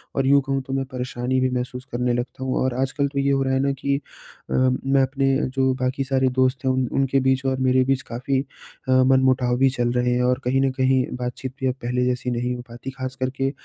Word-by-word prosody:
और 135 - +1
यूँ 140 +1 +5
कहूँ 135 0 -1
तो 135 0 -7
मैं 135 0 -1
परेशानी 125 0 -2
भी 130 - +2
महसूस 125 0 -4
करने 125 0 0
लगता 120 +2 -4
हूँ 130 - -1
और 130 -1 0
आजकल 135 +2 0
तो 140 0 -3
ये 140 0 +2
हो 135 - +2
रहा 135 0 0
है 130 - +2
ना 140 0 +1
कि 140 +1 -1
अ, 140 - -13
मैं 130 +1 +2
अपने 135 +1 +1
अ, - - 0
जो 130 0 +1
बाकी 130 +2 0
सारे 130 -1 +1
दोस्त 130 +1 0
हैं 130 - +3
उन 130 0 +1
उनके 135 0 +2
बीच 130 0 +1
और 130 0 +1
मेरे 130 0 +3
बीच 135 0 +1
काफ़ी 130 +3 -1 0.5
अ, - - +3
मनमुटाव 130 -1 +3
भी 135 +1 +4
चल 120 -2 -1
रहे 125 0 +1
हैं 125 - +1
और 125 0 +2
कहीं 130 +2 +1
न 135 - +2
कहीं 130 0 +2
बातचीत 125 +1 -5
भी 130 - 0
अब 130 - +1
पहले 125 +1 0
जैसी 125 0 -1
नहीं 120 +1 -1
हो 120 - -6
पाती। 120 +3 -8
ख़ासकर 130 0 -4
के 135 0 +1
130 Hz, 245 wpm, -23 LUFS, 125-135 Hz, 0.5 s, यूँ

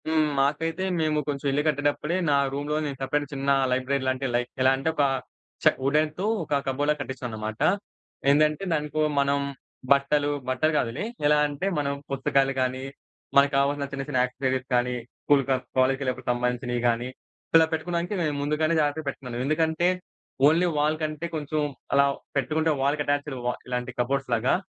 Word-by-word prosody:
హ్మ్. 155 -1 +3
మాకైతే, 160 +6 0 0.2
మేము 155 -1 +1
కొంచెం 140 -1 -2
ఇల్లు 145 +2 +1
కట్టేటప్పుడే 145 +2 0
నా 140 - +4 0.2
రూమ్‌లో 145 +2 -2
నేను 140 -2 -4
సెపరేట్‌గా 145 +1 -1
చిన్న 140 0 -2 0.2
లైబ్రరీ 130 +2 0
లాంటి, 130 +1 0
లైక్ 120 0 0
ఎలా 130 0 +5
అంటే, 135 +4 -1
ఒక 145 - +2 0.6
చె - - +7
వుడెన్‌తో 155 +6 +1 0.2
ఒక 150 - -4
కబోర్డ్‌లా 145 +3 +1
కట్టిచ్చానన్నమాట. 115 -5 -5 0.7
ఏందంటే, 150 +4 +3
దానికొ 150 0 -1 0.2
మనం 140 0 +2 0.5
బట్టలు 145 +1 +3 0.2
బట్టలు 130 +5 +2
గాదులే. 120 - -1 0.2
ఎలా 150 0 +5
అంటే, 145 +6 -3
మనం 140 -1 0 0.2
పుస్తకాలు 135 0 +1
కానీ, 130 0 -1 0.5
మనకు 140 +1 +5
కావాల్సిన 140 +1 +1
చిన్న 135 0 -3
చిన్న 130 -4 +1
యాక్సెసరీస్ 130 0 -2
కానీ, 125 0 +1 0.3
స్కూల్ 140 -2 +4
ఆర్ 130 - -5 0.2
కాలేజ్‌కి 135 +1 +2
ఎళ్లేటప్పుడుకి 130 -1 -1
సంబంధించినవి 125 0 -1
గానీ, 120 +2 -1 0.5
ఇలా 160 - +6
పెట్టుకోవడానికి 170 +3 -2
నేను 150 -3 0
ముందుగానే 155 +3 +1
జాగ్రత్తగా 150 0 0
పెట్టుకున్నాను. 125 -3 -5
ఎందుకంటే, 160 +3 +1 0.6
ఓన్లీ 170 +4 +4
వాల్ 155 +1 +2
కంటే 155 +1 -3
కొంచెం 155 0 -2 0.3
అలా 140 0 +6 0.3
పెట్టుకుంటే, 155 +3 +1
వాల్‌కి 145 +2 +1
అటాచ్డ్ 145 -1 -1
వ - - 0 0.2
ఇలాంటి 125 0 -2
కబోర్డ్స్‌లాగా 125 -2 +1
140 Hz, 155 wpm, -26 LUFS, 130-150 Hz, 0.7 s, చె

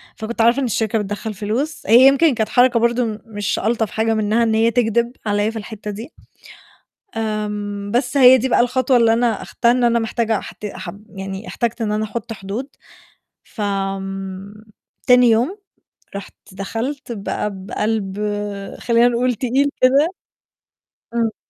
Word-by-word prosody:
فكنت 230 +1 -3
عارفة 235 +4 +4
إن 275 - 0
الشركة 225 -1 0
بتدخّل 210 +2 -4
فلوس، 225 +10 -3
هي 240 +5 +8
يمكن 275 +2 +4
كانت 220 -1 -1
حركة 245 0 +4
برضه 235 +1 +2
م 215 -1 -4
مش 205 -3 -2
ألطف 220 -1 0
حاجة 225 0 0
منها 215 +1 +1
إن 225 -1 +1
هي 225 +1 +3
تكدِب 235 0 +1
عليّا 205 0 +1
في 225 - -6
الحِتّة 210 0 -7
دي. 225 +9 -8 1.1
آمم، 210 -2 -3
بس 245 +1 0
هي 260 -1 +8
دي 260 +2 -1
بقى 240 - +3
الخطوة 255 +1 +2
اللي 230 -2 +4
أنا 230 -2 +1
أخدتها 235 - +1
إن 245 0 +2
أنا 235 0 +3
محتاجة 225 -1 0
أحت - - -10
أح 210 - -6 0.2
يعني 195 +1 -7
احتجت 235 0 -2
إن 215 -2 -1
أنا 215 +1 0
أحُطّ 225 +1 -5
حدود، 210 +6 -5 0.8
ف 220 - -9
آمم 195 -1 -4 0.5
تاني 250 0 +6
يوم 245 - +2 0.6
رُحت 200 - -7 0.2
دخلت 230 +9 -5
بقى 210 -1 -3
بقلب 195 +1 -3 0.6
خلّينا 235 0 +3
نقول 245 +1 +1
تقيل 265 +5 +1
كده 275 +4 +5 1.1
إمم. 230 -2 0
225 Hz, 155 wpm, -20 LUFS, 210-245 Hz, 1.1 s, هي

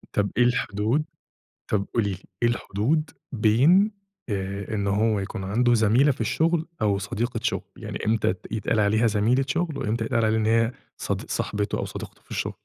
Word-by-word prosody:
طب 100 -1 +2
إيه 125 - +6
الحُدود 120 +3 +1 0.7
طب 100 -2 0
قولي 105 -3 +2
لِي، 95 - -3 0.3
إيه 120 - +5
الحُدود 120 +7 0 0.2
بين 135 - +4 0.4
آآ، 100 +1 -3
إن 100 -1 -1
هو 105 +1 +2
يكون 95 0 -5
عندُه 120 +5 +2
زَميلة 115 +6 +4
في 125 - -12
الشغل 160 +8 +1 0.2
أو 100 -2 +2
صديقة 115 +4 -3
شغل، - - 0
يعني - - -6
إمتى 110 -4 +2
تت 95 +3 -12
يتقال 110 0 0
عليها 110 +3 +3
زَميلة 115 +5 +2
شغل 165 0 -1
وإمتى 110 +2 -1
يتقال 115 -1 +1
عليها 110 0 +2
إن 110 - 0
هي 115 +1 +3 0.2
صدق - - -3
صاحبتُه 105 0 -1
أو - - -1
صديقته - - -8
في - - -31
الشغل؟ - - -2
110 Hz, 180 wpm, -25 LUFS, 105-125 Hz, 0.7 s, إيه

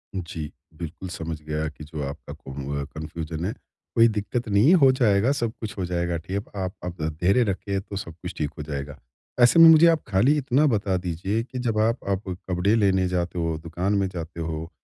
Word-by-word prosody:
जी। 80 -4 -5 0.3
बिल्कुल, 85 +2 -6
समझ 80 -2 -5
गया 75 +1 -2
कि 75 0 -12
जो 75 0 -6
आपका 70 +3 -8
कुनवा 70 +1 -5
कन्फ़्यूजन 80 +1 -5
है। 105 - -1 0.4
कोई 115 0 +7
दिक्कत 110 +2 -2
नहीं 100 +6 +4
है 180 - +7
हो 135 -1 +7
जाएगा, 115 -1 +3
सब 120 -6 -1
कुछ 105 -2 -6
हो 90 - -1
जाएगा 85 -1 -1
ठीक। 95 +5 -4
आप 95 -1 -3
आप 85 -2 -6
धैर्य 90 +9 +2
रखें 100 -1 -2
तो 100 - -9
सब 85 -4 -6
कुछ - - -5
ठीक 75 -1 -1
हो 75 - -5
जाएगा। 70 -1 -5 0.4
ऐसे 120 +7 +6
में 165 - +11
मुझे 160 +1 +8
आप 165 -2 +3
खाली 115 +9 +3
इतना 140 +2 +2
बता 100 -6 +1
दीजिए 90 +5 -2
कि 130 0 -7
जब 115 -3 -1
आप 115 +3 +2
आप 100 +1 0 0.3
कपड़े 90 +5 +2
लेने 95 -4 +3
जाते 90 -1 -2
हो, 80 -1 -1
दुकान 90 +5 -1
में 100 -1 +1
जाते 85 -2 -7
हो 80 0 -4
95 Hz, 205 wpm, -25 LUFS, 80-110 Hz, 0.4 s, में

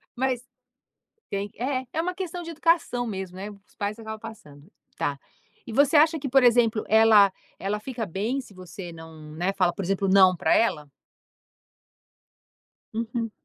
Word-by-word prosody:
Mas 255 -1 -1 0.9
tem 200 +1 -3
é. 260 +2 -2
É 320 - -1
uma 365 +2 -2
questão 360 -2 -5
de 335 - -7
educação 325 -7 +1
mesmo, 190 -4 -5
né, 200 +2 -6
os 200 -1 -18
pais 205 +2 -3
acabam 220 -1 -7
passando. 175 -9 -12 0.3
Tá. 140 -1 -2 0.5
E 230 - -7
você 285 +6 +4
acha 315 +2 +5
que, 280 -1 -4
por 270 +1 +4
exemplo, 235 -2 +4
ela 215 -3 +6 0.3
ela 200 +2 -2
fica 235 -1 -5
bem, 210 +9 -2
se 225 -6 -14
você 185 -1 -9
não, 160 -2 -12
né 180 +4 0
fala, 185 -3 +2
por 195 - -5
exemplo, 195 +2 0
não 190 -1 +6
pra 160 - +2
ela? 155 -10 +1 2.1
Uhum. 230 0 -3
220 Hz, 160 wpm, -25 LUFS, 190-255 Hz, 2.1 s, ela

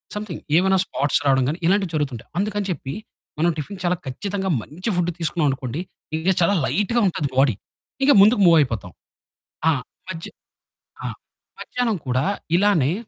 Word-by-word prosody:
Something 210 -5 -5 0.2
ఏవన్నా 190 +1 +4
spots 140 0 +1
రాడం 135 -1 +4
గానీ, 155 +5 -1
ఇలాంటివి 190 +1 +2
జరుగుతుంటాయి. 135 -6 -3
అందుకని 205 +1 -1
చెప్పి 135 -5 -5 0.5
మనం 170 +2 +3
టిఫిన్ 185 +6 -6
చాలా 180 0 +2
ఖచ్చితంగా 190 +8 -3
మంచి 175 - -5
ఫుడ్ 175 0 +1
తీసుకున్నాం 165 -2 +1
అనుకోండి, 135 +4 -4 0.4
ఇంక 175 +4 +1
చాలా 200 +4 +4
లైట్‌గా 210 - +1
ఉంటది 155 -5 -1
బాడీ. 135 -6 +4 0.5
ఇక 285 - +6
ముందుకు 210 +1 +5
మూవ్ 170 -1 +7
అయిపోతాం. 115 - -1 0.8
ఆ! - - +5 0.4
మధ్య 165 -2 -5 0.8
ఆ! - - -1 0.5
మధ్యాహ్నం 245 -4 -1
కూడా 130 +2 +1 0.3
ఇలానే 175 -7 +3
170 Hz, 145 wpm, -22 LUFS, 140-200 Hz, 0.8 s, మూవ్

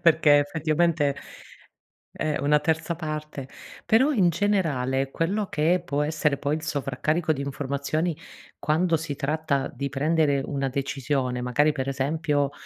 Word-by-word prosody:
perché 155 -3 +6
effettivamente 155 0 +1 1.0
è 155 -1 -2
una 150 +2 +3
terza 160 +2 -1
parte, 155 -4 -5 0.4
però 260 +7 +4
in 190 -10 +3
generale, 140 -9 0
quello 195 +5 -1
che 170 +4 +1
può 145 -1 -1
essere 150 -1 0
poi 145 +1 -1
il 155 - -5
sovraccarico 155 +2 0
di 140 - -5
informazioni, 140 +4 -2 0.4
quando 165 +3 +1
si 150 -3 -5
tratta 150 -1 -1
di 140 +2 -3
prendere 145 0 +1
una 135 -2 -2
decisione, 130 -2 -2
magari 145 +5 +2
per 135 -1 -3
esempio, 145 +1 0
150 Hz, 135 wpm, -25 LUFS, 140-160 Hz, 1.0 s, perché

